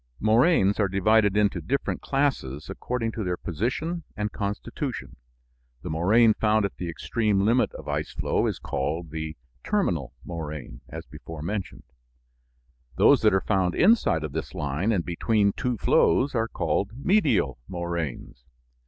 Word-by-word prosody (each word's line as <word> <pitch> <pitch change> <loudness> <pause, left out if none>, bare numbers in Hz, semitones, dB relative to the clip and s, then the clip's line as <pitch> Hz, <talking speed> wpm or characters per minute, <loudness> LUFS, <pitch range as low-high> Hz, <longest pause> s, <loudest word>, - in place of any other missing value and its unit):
Moraines 110 - +3
are 100 - +3
divided 100 +2 +3
into 105 -1 +2
different 140 +2 -2
classes 130 - -1
according 120 -2 -3
to 110 - -4
their 90 -1 -1
position 130 - -2 0.2
and 105 0 -2
constitution. 100 -1 -4 0.7
The 90 - -4
moraine 110 +8 +4
found 110 -1 +2
at 100 - -5
the 90 - -4
extreme 105 +4 0
limit 120 +3 +3
of - - -9
ice - - -2
flow - - 0
is - - -2
called 80 +4 -3
the 80 -1 -5 0.3
"terminal" 80 - 0
moraine, 75 -8 -6
as - - -7
before 75 +3 -9
mentioned. 90 - -4 1.1
Those - - +5
that - - +5
are 95 - +2
found 95 -4 +1
inside 180 - +4
of 75 - -4
this 80 +1 -5
line 75 +10 -1
and 90 -6 0
between 100 +3 +1
two 125 -3 -2
flows 135 +6 +3
are 115 -2 +1
called 100 -2 -1
"medial" 135 - +2
moraines. 85 -8 -4
100 Hz, 145 wpm, -26 LUFS, 80-115 Hz, 1.1 s, Those